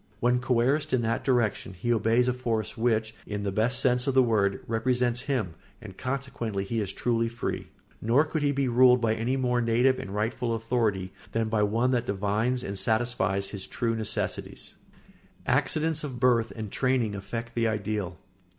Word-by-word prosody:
When 125 +2 +2
coerced 130 +5 +1
in 125 -2 +2
that 115 0 -1
direction 110 -7 0
he 120 +7 0
obeys 115 +2 +2
a 125 - +2
force 115 -4 -2
which, 110 -1 0
in 105 -1 -3
the 100 - -1
best 115 +6 +1
sense 125 0 +2
of 135 - +1
the 130 - +7
word, 105 -4 +1
represents 120 +1 0
him, 110 - 0 0.3
and 105 -5 -10
consequently 125 -5 -3
he 115 +3 -2
is 100 -2 -2
truly 115 -1 0
free; 115 +1 -4 0.3
nor 120 +8 +3
could 155 0 -2
he 145 -1 +2
be 140 -1 0
ruled 125 +1 +6
by 115 -2 +1
a 115 +4 -1
more 125 -2 +1
native 120 +3 +3
and 130 - -6
rightful 115 +3 -1
authority 110 -5 -1 0.2
than 115 -1 0
by 110 -1 +1
one 115 +5 +2
that 120 -1 0
divines 105 +5 0
and 100 0 -4
satisfies 105 -3 0
his 100 -2 -5
true 115 -1 -1
necessities. 110 -1 -3 0.7
[Sidenote: - - +3
Accidents 155 -1 -1
of 130 -5 -5
birth 120 -2 +3
and 110 -3 -6
training 130 -5 +1
affect 115 +4 -5
the 115 -1 +1
ideal. 105 -4 -2
115 Hz, 180 wpm, -27 LUFS, 110-125 Hz, 0.7 s, the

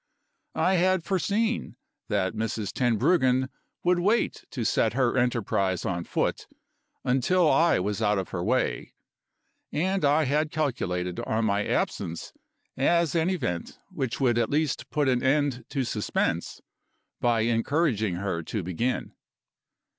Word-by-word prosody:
I 185 0 +2
had 185 0 +2
foreseen 210 +5 -1 0.3
that 95 0 0
Mrs. 110 -1 -3
Tenbruggen 130 - +2 0.3
would 180 0 +3
wait 210 +6 +1
to 120 -5 -4
set 110 0 +2
her 125 -2 +1
enterprise 105 -7 0
on 85 -2 -2
foot, - - -1 0.6
until 145 +8 +2
I 170 +1 +4
was 100 +3 -2
out 105 -1 +2
of 95 - -3
her 90 -2 -3
way; - - -1 0.8
and 190 +4 0
I 145 +2 +4
had 150 +3 +1
calculated 90 - -2
on 110 +1 -1
my 100 -1 +1
absence 85 0 -2 0.4
as 170 +4 +2
an 165 +1 +2
event 120 - -3
which 130 -3 -3
would 120 -4 +2
at 115 - +1
least 150 -1 -1
put 150 -2 0
an 125 -2 +2
end 135 -3 +1
to 135 -2 -1
suspense 110 -3 -2 0.6
by 120 -2 +2
encouraging 115 - +1
her 90 -2 -2
to 100 +5 -4
begin. 95 +9 -2
125 Hz, 135 wpm, -27 LUFS, 105-155 Hz, 0.8 s, I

